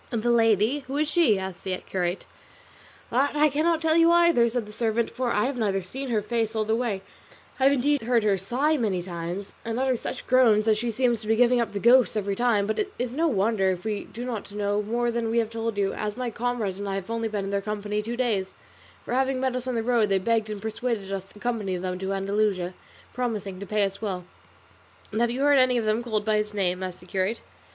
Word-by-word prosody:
"And 230 -3 -2
the 240 - +3
lady, 225 +3 +3
who 270 +2 -3
is 305 +1 +1
she?" 305 - +3
asked 190 -1 -6
the 185 -1 -2
curate. 180 -1 -3 0.9
"That 270 +5 +1
I 300 +1 +4
cannot 320 +3 +1
tell 320 0 +3
you 335 0 +6
either," 340 -9 +5
said 235 -1 -2
the 210 - -11
servant, 225 +1 0
"for 250 -1 -2
I 210 - +2
have 265 0 -2
not 210 -4 0
seen 265 +9 -5
her 215 -3 0
face 225 0 -1
all 215 -1 0
the 220 +1 +1
way: 225 -5 -2 0.6
I 260 - +3
have 275 - +6
indeed 285 +2 +2
heard 235 0 +2
her 205 -2 +3
sigh 255 +11 0
many 200 -8 -1
times 175 +2 -5
and 230 0 -3
utter 260 -1 +2
such - - -5
groans 235 -5 +4
that 220 -1 +3
she 240 +1 -1
seems 235 -1 +1
to 215 - -9
be 225 - +3
giving 245 +1 +4
up 230 - -2
the 200 - -3
ghost 240 +1 +5
every 200 -1 -1
time; 230 -3 +2
but 220 - -2
it 405 -1 -1
is 245 0 -3
no 325 +5 +1
wonder 205 -5 +2
if 180 -1 -2
we 210 -2 -2
do 240 +2 -7
not 225 -5 -5
know 205 0 0
more 235 +3 -1
than 230 -1 -1
we 230 - 0
have 225 -1 +1
told 225 -1 -3
you, 195 -1 +1
as 210 +1 -4
my 250 -2 -2
comrade 230 -5 -2
and 200 0 -4
I 195 - -2
have 195 +2 -5
only 230 0 -1
been 210 -3 -3
in 195 - -4
their 200 0 0
company 210 0 -3
two 235 +3 -5
days, 215 -7 0 0.5
for - - -4
having 265 0 +1
met 260 -1 0
us 255 0 -3
on 255 - -1
the 225 - 0
road 230 -3 +2
they 195 - +3
begged 220 +2 0
and 210 -1 -4
persuaded 220 -2 -3
us 190 -1 -4
to 195 - -15
accompany 210 -5 -2
them 180 0 -4
to 190 0 -3
Andalusia, 195 -2 0 0.4
promising 210 -6 -3
to 200 - -7
pay 210 +1 +1
us 195 +1 -2
well." 185 -5 -3 0.9
"And 215 +2 -1
have 235 - +3
you 250 +3 -3
heard 285 -1 +5
any 255 -1 +4
of 230 - -1
them 215 +2 +1
called 215 -3 -2
by 215 -1 +2
his 210 0 -2
name?" 185 -2 0
asked 185 -2 -5
the - - -14
curate. 190 +4 -1
220 Hz, 250 wpm, -26 LUFS, 200-245 Hz, 0.9 s, you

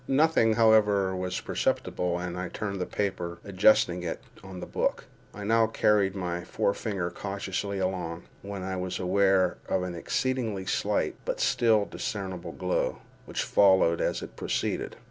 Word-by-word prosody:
Nothing, 135 -5 +4
however, 105 -4 +4
was 90 0 -2
perceptible, 90 -1 -1
and 90 0 -4
I 90 -1 -4
turned 100 -3 -4
the 90 - -2
paper, 90 -4 -2
adjusting 95 -2 +4
it 85 - -3 0.2
on 95 -1 -8
the - - -5
book. - - -1 0.3
I 105 - -8
now 115 +2 +4
again 110 - -7
carried 100 -2 +3
my 90 -2 -3
forefinger 100 -2 -1
cautiously 100 0 -3
along, 90 -3 -2 0.2
when 100 -1 -6
I 95 0 -3
was 90 0 -3
aware 95 0 +2
of 95 - +1
an 90 -1 -4
exceedingly 110 +2 -1
slight, - - 0
but - - -3
still 110 -3 +3
discernable 95 -6 -5
glow, 90 0 -1 0.3
which - - -2
followed 95 -4 +4
as - - -1
it - - -9
proceeded. - - -2
95 Hz, 155 wpm, -28 LUFS, 90-105 Hz, 0.3 s, Nothing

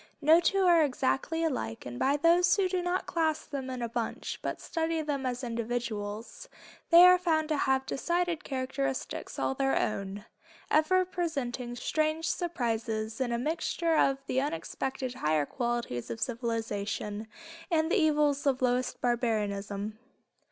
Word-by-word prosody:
No 315 +3 +6
two 390 +2 +2
are 345 -2 +6
exactly 285 +4 0
alike, 245 - -2
and 120 0 -6
by 280 +2 +2
those 345 +4 +4
who 395 -2 +2
do 365 -1 -1
not 355 +1 -1
class 315 -2 0
them 270 -3 -5
in 255 -2 -4
a - - 0
bunch, 230 0 -4
but - - -3
study 325 -1 -2
them 280 -3 -2
as 250 +1 -3
individuals, 230 -2 -4 0.4
they 340 +1 +9
are 365 0 +7
found 320 -3 +1
to 310 - +2
have 265 -1 +1
decided 345 +3 -1
characteristics 265 0 -3
all - - 0
their 270 0 +1
own, 200 0 -2 0.5
ever 370 +4 +4
presenting 275 -9 -3
strange 310 +5 0
surprises 225 -8 -2
in 245 -2 0
a 235 - +1
mixture 320 +4 0
of 275 -3 +3
the 260 -1 0
unexpected 270 -4 -3
higher 155 - +1
qualities 240 - -3
of 225 - -5
civilization 225 -3 -3 0.4
and 320 -1 +1
the 435 - +4
evils 295 -2 +2
of 260 -2 +1
lowest 250 0 0
barbarism. 215 -3 -1
265 Hz, 150 wpm, -30 LUFS, 230-320 Hz, 0.5 s, they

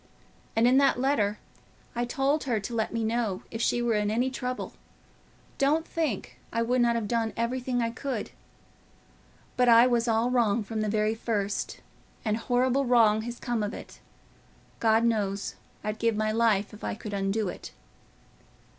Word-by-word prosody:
And 225 +2 +4
in 260 +2 +5
that 275 -3 +3
letter 220 -6 +1 0.6
I 240 +1 0
told 270 +4 0
her 235 -5 +1
to 205 +4 -6
let 220 -1 -1
me 230 -1 -1
know 220 -4 -1
if 225 - -4
she 240 0 +1
were 235 -1 +2
in 210 -1 +1
any 245 +4 +1
trouble: 255 -1 -4 0.9
don't 300 +4 +2
think 310 - -3
I 230 - 0
would 245 +2 +1
not 235 -1 +3
have 225 -3 -1
done 225 -1 0
everything 245 +1 -1
I 230 - -1
could. 235 -2 -4 1.2
But 250 -1 +3
I 230 +1 +8
was 240 -1 +2
all 230 +2 +2
wrong 230 -3 +2
from 220 +1 -3
the 215 - 0
very 215 +1 +1
first, 210 -3 -2 0.4
and 215 -1 +1
horrible 250 +3 +1
wrong 225 -4 +4
has 235 +1 -6
come 240 -3 -1
of 210 +1 -2
it. - - -11 0.8
God 225 0 +3
knows, 205 -4 0 0.3
I'd 215 +1 -3
give 230 -1 +1
my 215 0 0
life 215 -3 +2
if 210 - -12
I - - -2
could 215 -1 -7
undo 200 +2 0
it." - - -8
230 Hz, 170 wpm, -28 LUFS, 215-245 Hz, 1.2 s, I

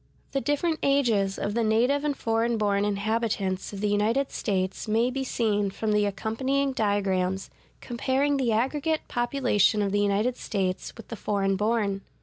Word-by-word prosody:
The 275 - -1
different 310 +3 0
ages 230 -9 +2
of 205 - -2
the 235 +1 +1
native 245 +6 +2
and 295 -2 -1
foreign 230 +1 0
born 205 -1 +1
inhabitants 205 -2 -1
of 200 -1 -7
the 210 - +1
United 220 +7 +1
States 190 0 -2
may 230 +3 +2
be 270 +1 -2
seen 210 -5 0
from 215 +3 -2
the 210 -1 +3
accompanying 260 +7 -1
diagrams(145) 195 -4 0 0.3
comparing 270 +4 0
the 255 -4 +1
aggregate 290 +8 0
population 240 -4 +2
of 200 - -1
the 205 - +1
United 205 +5 +1
States 185 -3 -2
with 225 - -12
the 230 - -5
foreign 195 -2 0
born. 205 -1 0
220 Hz, 160 wpm, -26 LUFS, 200-255 Hz, 0.3 s, the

